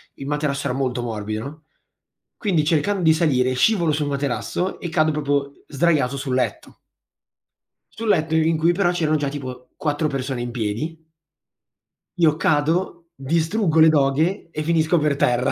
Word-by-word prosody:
il 135 - -8
materasso 145 -1 -1
era 125 - -2
molto 125 -2 -1
morbido 110 -1 -4
no, 150 +4 -9 0.7
quindi 180 -8 +1
cercando 175 +5 +1
di 160 -1 +5
salire, 130 -6 +1
scivolo 170 - +2
sul 150 -1 -1
materasso 140 +6 -2
e - - -5
cado 155 -2 +2
proprio 145 -2 -1 0.2
sdraiato 145 -3 +1
sul 135 -1 -3
letto. 130 - -3 1.2
Sul 225 - -6
letto 160 -4 +2
i 160 0 +3
in 165 -1 +2
cui, 165 +2 +3
però, 175 -1 +2
c'erano 155 -3 +1
già 145 -2 -1
tipo 130 -3 -8
4 150 0 -1
persone 135 -3 -3
in 120 - -4
piedi 125 +8 -4 1.1
io 155 -3 +4
cado, 165 +3 0
distruggo 165 +4 0
le 160 - +8
doghe 155 +6 +1
e 155 - -4
finisco 160 +1 +2
per 150 -2 +1
terra. 125 -2 +2
150 Hz, 160 wpm, -22 LUFS, 135-165 Hz, 1.2 s, le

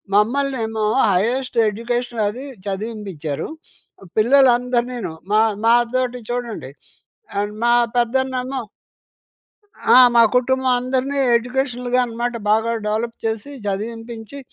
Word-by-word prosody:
మమ్మల్నేమో 225 -1 +1 0.3
highest 240 +8 0
education 235 +2 -3
అదీ 245 +7 -5 0.2
చదివింపించారు. 195 -7 -4 0.7
పిల్లలందరినీనూ 245 -3 +3 0.2
మా 215 - +4 0.3
మాతోటి 240 +2 +2
చూడండి 240 - -4 0.7
ఆహ్, 205 +1 -1
మా 240 - +4 0.3
పెద్దన్నేమో 260 +2 0 1.3
ఆ! - - +8 0.2
మా 235 - +8
కుటుంబం 260 +1 +2
అందరిని 260 +2 -1 0.2
ఎడ్యుకేషనల్‌గా 250 0 -1
అనమాట 240 +1 -3
బాగా 220 +2 +2 0.2
డెవలప్ 225 +2 -2
చేసి 225 +5 -3
చదివింపించి, 225 +4 -5
240 Hz, 90 wpm, -20 LUFS, 220-255 Hz, 1.3 s, ఆ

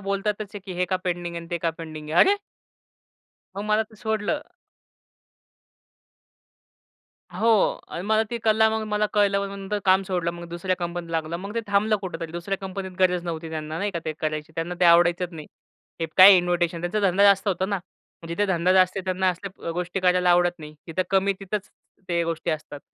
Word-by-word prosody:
बोलतातच 205 +2 -1
आहे - - -4
की 190 - -6
हे 180 - +2
का 185 +1 0
पेंडिंग 175 -1 -3
आहे 170 - -4
आणि 170 - -13
ते 175 - -1
का 165 0 0
पेंडिंग 155 -2 -9
आहे. 170 - +4
अरे! 400 +2 +6 1.2
मग 200 - -3
मला 215 +1 +2
ते 215 - -17
सोडलं. 220 +7 -1 2.9
हो. 225 -3 +2
आणि 170 - -5
मला 220 0 +3
ती 235 - -2
कला, 220 0 +4
मग 220 0 -1
मला 210 0 +1
कळलं 205 -1 +3
मग 200 - -3
नंतर 195 +1 -3
काम 190 0 +4
सोडलं. 175 -3 -1
मग 170 0 -9
दुसऱ्या 175 +2 -2
कंपनीत 175 -1 -5
लागलो. 165 0 -2
मग 200 +4 -7
ते 230 - 0
थांबलं 205 +2 +2
कुठेतरी. 165 -4 -6
दुसऱ्या 175 +3 -3
कंपनीत 190 0 -6
गरजच 180 -2 +2
नव्हती 165 -1 -5
त्यांना 155 0 -4
नाही 205 +1 -1
का, 170 - -3
ते 155 - -2
करायची. 155 0 -3
त्यांना 165 +2 -3
ते - - +4
आवडायचंच 175 +1 +4
नाही. 155 -2 -9 0.5
हे 165 - 0
काय 190 +1 +10
इन्विटेशन, 175 -1 0
त्यांचा 175 +5 -1
धंदा 185 +3 +2
जास्त 200 +1 +5
होता 190 0 0
ना. 200 -1 -1 0.5
जिथे 200 +5 0
धंदा 180 -1 +2
जास्त 185 0 +4
त्यांना 185 0 +1
असल्या 185 -1 -7
गोष्टी 180 +2 -3
करायला 180 -1 +3
आवडत 175 0 +4
नाही 150 -1 -10
तिथं 170 +3 -1
कमी 195 +1 +3
तिथंच 200 +1 -4 0.4
ते 170 -1 +1
गोष्टी 165 -1 -2
असतात. 150 -2 -5
180 Hz, 190 wpm, -24 LUFS, 170-200 Hz, 2.9 s, काय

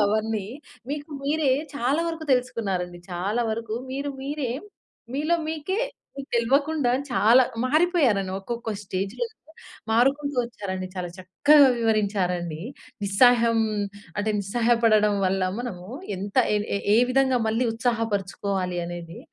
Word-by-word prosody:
అవన్నీ 215 -1 0 0.4
మీకు 295 +1 -5
మీరే 295 -1 +2 0.2
చాలా 275 +4 +1
వరకు 325 -1 -5
దెలుసుకున్నారండి. 195 -8 -1
చాలా 200 +7 -1
వరకు 220 0 -3 0.2
మీరు 280 +2 -3
మీరే 280 -2 -3 0.6
మీలో 305 +5 +1
మీకే 320 +6 -2 0.4
మీకు 275 0 -7
తెల్వకుండా 275 +3 +2 0.2
చాలా 240 +3 +6 0.2
మారిపోయారండి, 270 - +2
ఒక్కొక్క 235 +2 -4
స్టేజ్‌లో 195 - -3 0.6
మారుకుంటూ 275 +4 +2
ఒచ్చారండి. 190 -5 -5
చాలా 180 -1 -4
చక్కగా 280 +10 +5
వివరించారండి. 190 -7 0 0.4
నిస్సాహయం 230 +3 +4 0.6
అంటే, 215 +1 0
నిస్సహాయ 230 +4 +1
పడడం 210 -2 +4
వల్ల 190 0 0 0.2
మనము 185 -8 -6 0.3
ఎంత 200 +2 -6 0.2
ఎ - - +3 0.4
ఏ - - +6
విధంగా 260 -1 +3
మళ్ళీ 225 +3 +1
ఉత్సాహపరుచుకోవాలి 200 -5 -1
అనేది, 170 -1 -7
230 Hz, 110 wpm, -25 LUFS, 195-270 Hz, 0.6 s, చాలా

